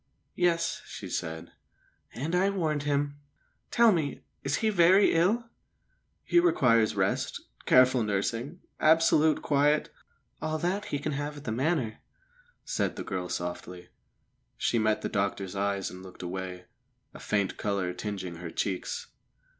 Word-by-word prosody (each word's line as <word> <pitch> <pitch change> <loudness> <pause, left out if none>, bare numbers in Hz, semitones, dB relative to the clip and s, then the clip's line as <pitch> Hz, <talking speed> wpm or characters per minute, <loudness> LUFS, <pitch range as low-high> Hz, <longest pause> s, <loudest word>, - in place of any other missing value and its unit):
"Yes," 170 -2 +1
she - - -7
said. 80 0 -4 0.6
"And 145 +8 -3
I 185 +2 +3
warned 160 -7 -1
him. 145 0 0 0.5
Tell 235 -1 +5
me, 155 -7 -1 0.2
is 140 +1 0
he 220 - +1
very 190 +1 +5
ill?" 195 +9 +2 0.8
"He 345 - +4
requires 115 - +3
rest, - - 0 0.3
careful 130 0 +6
nursing, 115 - -2 0.2
absolute 160 -1 +4
quiet 150 +1 +2 0.2
" - - -43
"All 155 0 -1
that 185 +6 -1
he 145 - -2
can 145 +2 -3
have 145 +1 -3
at 145 - -10
the 115 - -3
Manor," 130 -2 0 0.7
said - - -1
the - - -5
girl 90 -3 -4
softly. 90 +1 -5 0.7
She 120 - +1
met 110 0 +1
the - - 0
doctor's 100 -1 -2
eyes 100 0 -1
and 90 - -10
looked 95 -1 -11
away, 90 0 -5 0.5
a - - -10
faint 100 -3 -1
colour 100 -3 -1
tingeing 95 -3 -5
her 85 0 -6
cheeks. 95 +2 -3
130 Hz, 145 wpm, -29 LUFS, 100-160 Hz, 0.8 s, careful